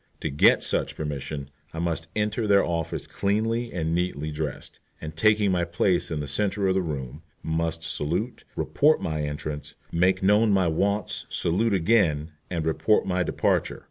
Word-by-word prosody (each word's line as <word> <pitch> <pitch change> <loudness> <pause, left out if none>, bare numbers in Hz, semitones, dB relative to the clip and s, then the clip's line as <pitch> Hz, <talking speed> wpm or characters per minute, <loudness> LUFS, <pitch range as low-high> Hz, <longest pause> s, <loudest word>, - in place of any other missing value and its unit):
To 80 - -2
get 70 - +5
such - - 0
permission 70 -1 -5 0.2
I - - -6
must 85 -1 -1
enter 105 +1 0
their 100 -1 +5
office 85 -2 -3
cleanly 115 +4 -1
and 80 -2 -2
neatly 85 -4 -1
dressed, 75 -2 -5 0.2
and, 80 0 -7
taking 105 +3 +3
my 90 -1 +1
place 90 +1 +1
in 80 -3 -2
the 75 - -5
centre 100 +6 0
of 95 - +3
the 95 - +1
room, 70 -7 -5 0.2
must 80 0 -1
salute, 85 +10 -2
report 155 +2 +3
my 80 -2 -2
entrance, 75 0 -5 0.2
make 90 +2 +2
known 105 +3 +4
my 95 -3 +3
wants, 100 +5 -1
salute 100 +5 +1
again, 85 -5 +2 0.2
and 85 -3 -2
report 95 +6 +2
my 90 -1 0
departure. 85 - 0
85 Hz, 165 wpm, -26 LUFS, 80-100 Hz, 0.2 s, get